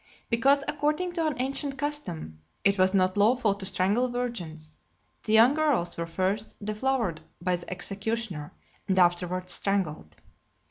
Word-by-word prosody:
Because, 275 Hz, +5 st, +4 dB
according 300 Hz, +4 st, 0 dB
to 330 Hz, -2 st, 0 dB
an 300 Hz, -, -1 dB
ancient 275 Hz, +2 st, -1 dB
custom, 185 Hz, -, -4 dB, 0.2 s
it 200 Hz, 0 st, +3 dB
was 185 Hz, +1 st, +4 dB
not 185 Hz, 0 st, +2 dB
lawful 220 Hz, 0 st, +3 dB
to 200 Hz, -1 st, -4 dB
strangle 205 Hz, +7 st, +1 dB
virgins, 175 Hz, -11 st, -5 dB, 0.5 s
the 215 Hz, -, 0 dB
young 230 Hz, +5 st, +7 dB
girls 295 Hz, -, +1 dB
were 170 Hz, 0 st, -3 dB
first 190 Hz, +5 st, -1 dB
deflowered 215 Hz, -6 st, -1 dB, 0.2 s
by 180 Hz, +1 st, 0 dB
the 175 Hz, -, -10 dB
executioner, 195 Hz, -3 st, -3 dB, 0.4 s
and 190 Hz, -, +1 dB
afterwards 180 Hz, 0 st, +2 dB
strangled. 155 Hz, -, -1 dB
200 Hz, 140 wpm, -27 LUFS, 180-255 Hz, 0.5 s, young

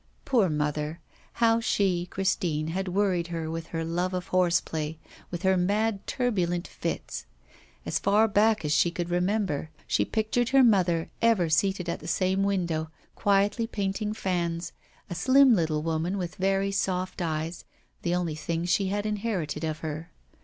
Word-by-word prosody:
Poor 230 Hz, -9 st, +3 dB
mother! 150 Hz, +1 st, -2 dB, 0.3 s
how 230 Hz, -1 st, +3 dB
she, 185 Hz, -6 st, +1 dB
Christine, 175 Hz, -5 st, -1 dB
had 190 Hz, +3 st, -2 dB
worried 180 Hz, -2 st, +1 dB
her 165 Hz, -2 st, -4 dB
with 165 Hz, 0 st, -5 dB
her 165 Hz, -1 st, -3 dB
love 175 Hz, +3 st, -1 dB
of 180 Hz, +1 st, -4 dB
horseplay, 170 Hz, -4 st, +1 dB, 0.3 s
with 175 Hz, +1 st, -5 dB
her 190 Hz, 0 st, +4 dB
mad 205 Hz, +3 st, 0 dB
turbulent 185 Hz, -8 st, 0 dB
fits. -, -, -5 dB, 0.6 s
As -, -, 0 dB
far 210 Hz, +3 st, +4 dB
back 215 Hz, -2 st, +3 dB
as 150 Hz, -, +1 dB
she 170 Hz, -, +4 dB
could 175 Hz, 0 st, -4 dB
remember, 180 Hz, -4 st, 0 dB, 0.2 s
she -, -, +2 dB
pictured 225 Hz, +2 st, 0 dB
her 270 Hz, 0 st, +6 dB
mother 180 Hz, -8 st, +3 dB
ever 225 Hz, -8 st, +3 dB
seated 185 Hz, +3 st, +1 dB
at 170 Hz, -, -2 dB
the 160 Hz, -, -10 dB
same 185 Hz, +2 st, +1 dB
window, 175 Hz, -5 st, 0 dB, 0.2 s
quietly 205 Hz, +2 st, +2 dB
painting 205 Hz, 0 st, -2 dB
fans, 175 Hz, -4 st, -2 dB, 0.4 s
a -, -, -5 dB
slim 260 Hz, +9 st, +5 dB
little 160 Hz, -6 st, +1 dB
woman 165 Hz, +4 st, -1 dB
with 180 Hz, -2 st, -3 dB
very 195 Hz, +1 st, +1 dB
soft 185 Hz, -1 st, -1 dB
eyes, 160 Hz, 0 st, -3 dB, 0.4 s
the 175 Hz, 0 st, 0 dB
only 175 Hz, -3 st, -1 dB
thing 165 Hz, +2 st, -3 dB
she 190 Hz, +2 st, +2 dB
had 205 Hz, +2 st, -1 dB
inherited 205 Hz, -8 st, -2 dB
of 155 Hz, 0 st, -3 dB
her. 155 Hz, +1 st, -5 dB
180 Hz, 160 wpm, -27 LUFS, 165-200 Hz, 0.6 s, her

